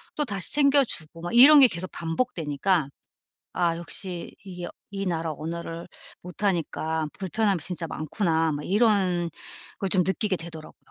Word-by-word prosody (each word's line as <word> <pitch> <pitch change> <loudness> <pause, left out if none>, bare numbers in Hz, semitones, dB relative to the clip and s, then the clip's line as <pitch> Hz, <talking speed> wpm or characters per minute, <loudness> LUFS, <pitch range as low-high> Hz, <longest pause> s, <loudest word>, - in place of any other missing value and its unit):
또 295 - +1
다시 200 -7 -1
챙겨 280 -1 +5
주고 165 - -3
막 175 +4 -5
이런 280 +5 +9
게 265 - +9
계속 185 -4 -4
반복되니까 165 - -1 0.6
'아 170 -2 0
역시 175 +1 -6
이게 180 -3 -7 0.2
이 195 0 -4
나라 165 -3 -2
언어를 165 +2 -6 0.3
못 180 +3 -9
하니까 160 -4 -1
불편함이 200 -1 0
진짜 170 0 -3
많구나.' 160 0 -1
막 145 0 -4
이런 190 -5 +2 0.5
걸 195 - -1
좀 185 -1 +3
느끼게 190 +1 +1
되더라고요. 165 -2 -10
175 Hz, 305 characters per minute, -25 LUFS, 165-200 Hz, 0.6 s, 이런